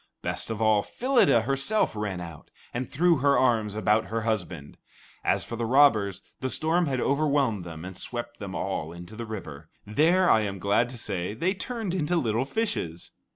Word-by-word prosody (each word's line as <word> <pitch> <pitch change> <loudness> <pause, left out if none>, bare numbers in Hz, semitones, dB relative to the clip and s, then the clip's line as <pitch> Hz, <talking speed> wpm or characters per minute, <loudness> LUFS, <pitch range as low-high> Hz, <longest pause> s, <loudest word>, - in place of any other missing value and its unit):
Best - - -3
of 110 0 -2
all, 110 -2 +4
Phyllida 245 - +3
herself 135 - 0
ran 105 -3 -3
out, 85 -3 -9 0.2
and 125 +1 -3
threw 170 +3 +3
her 140 +1 +3
arms 110 -5 +2
about 110 0 +2
her 110 +4 -2
husband. 90 -9 -3 0.4
As - - +1
for 115 - -6
the 115 - -1
robbers, 115 -7 +4 0.2
the 130 - -2
storm 165 +5 +1
had 130 -2 -1
overwhelmed 140 -8 +1
them 85 -1 -8
and 95 0 -7
swept 120 +4 -5
them 95 -3 -6
all 80 -2 -3
into 90 +5 -10
the 115 0 -6
river. 80 -8 -8 0.2
There, 165 - +3
I 110 - +5
am 100 -2 -3
glad 100 +6 +2
to 125 - -8
say, 100 -3 -3
they 175 +11 0
turned 220 -2 -4
into 175 -1 0
little 120 -5 +1
fishes. 135 - -3
115 Hz, 185 wpm, -27 LUFS, 100-140 Hz, 0.4 s, I